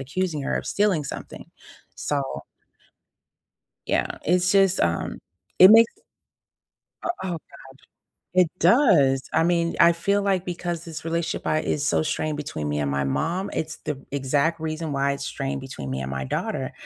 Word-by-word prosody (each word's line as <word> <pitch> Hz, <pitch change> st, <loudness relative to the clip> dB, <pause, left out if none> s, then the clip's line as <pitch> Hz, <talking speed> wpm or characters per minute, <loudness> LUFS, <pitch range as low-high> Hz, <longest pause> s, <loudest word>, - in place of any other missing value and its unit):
accusing 155 Hz, +3 st, -2 dB
her -, -, -1 dB
of -, -, -4 dB
stealing 200 Hz, -7 st, +1 dB
something. -, -, -8 dB, 0.5 s
So 145 Hz, -1 st, -1 dB, 1.6 s
yeah, -, -, -1 dB
it's 180 Hz, +2 st, +2 dB
just, 195 Hz, -2 st, +4 dB
um, 85 Hz, -1 st, -1 dB, 0.4 s
it 185 Hz, +2 st, +10 dB
makes 230 Hz, +1 st, +7 dB, 1.1 s
uh, -, -, -3 dB
oh 190 Hz, -, -3 dB
god. 170 Hz, -, -3 dB, 1.0 s
It 180 Hz, -3 st, +5 dB
does, 150 Hz, -, +4 dB
I -, -, +3 dB
mean, 170 Hz, 0 st, +1 dB
I 170 Hz, 0 st, +7 dB
feel 200 Hz, +4 st, 0 dB
like 190 Hz, -2 st, +1 dB
because 175 Hz, -1 st, -4 dB
this 165 Hz, -2 st, -8 dB
relationship 165 Hz, 0 st, -2 dB
I 155 Hz, -, +2 dB
is 150 Hz, 0 st, -1 dB
so -, -, +2 dB
strained 155 Hz, -1 st, -2 dB
between 140 Hz, -, -4 dB
me 75 Hz, -, -1 dB
and 70 Hz, -1 st, -1 dB
my 70 Hz, 0 st, 0 dB
mom, 165 Hz, -, -1 dB
it's 160 Hz, 0 st, -4 dB
the 140 Hz, -3 st, -5 dB
exact 145 Hz, +4 st, 0 dB
reason 160 Hz, -1 st, -3 dB
why 140 Hz, 0 st, +1 dB
it's 140 Hz, 0 st, -5 dB
strained 135 Hz, -1 st, -3 dB
between 100 Hz, -, -7 dB
me 65 Hz, +1 st, -3 dB
and 65 Hz, -, -5 dB
my 65 Hz, 0 st, -3 dB
daughter. -, -, -3 dB
160 Hz, 165 wpm, -24 LUFS, 135-180 Hz, 1.6 s, it